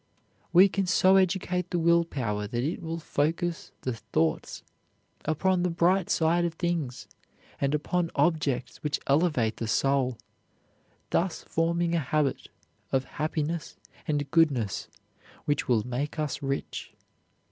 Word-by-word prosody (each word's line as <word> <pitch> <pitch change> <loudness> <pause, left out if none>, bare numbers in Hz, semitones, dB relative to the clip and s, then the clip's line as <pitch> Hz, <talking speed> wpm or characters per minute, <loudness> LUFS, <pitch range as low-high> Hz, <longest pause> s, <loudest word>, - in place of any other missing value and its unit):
We 180 +3 +8
can 195 -1 -1
so 190 0 +5
educate 180 -1 +1
the 175 - -1
will 170 0 +4
power 105 -9 -2
that 120 +3 -2
it 155 +5 -2
will 165 0 -4
focus 165 +2 -1
the 130 - -2
thoughts 80 -8 -1 0.6
upon 180 +4 +1
the 180 - +1
bright 175 +2 +2
side 170 +2 +2
of 170 -1 -1
things, 165 -8 -2 0.5
and 140 +1 +1
upon 170 +3 0
objects 140 -7 +1
which 150 -1 -2
elevate 140 -7 +2
the 115 - -3
soul, 130 0 +1 0.9
thus 175 0 0
forming 170 +1 0
a 170 - +2
habit 145 -1 -1 0.4
of 130 -1 +2 0.2
happiness 155 +1 -2 0.3
and 145 -2 -1
goodness 140 - +2 0.6
which 145 -1 0
will 115 -4 +2
make 135 +5 -3
us 150 -1 -2
rich. 135 0 -4
155 Hz, 135 wpm, -28 LUFS, 135-170 Hz, 0.9 s, We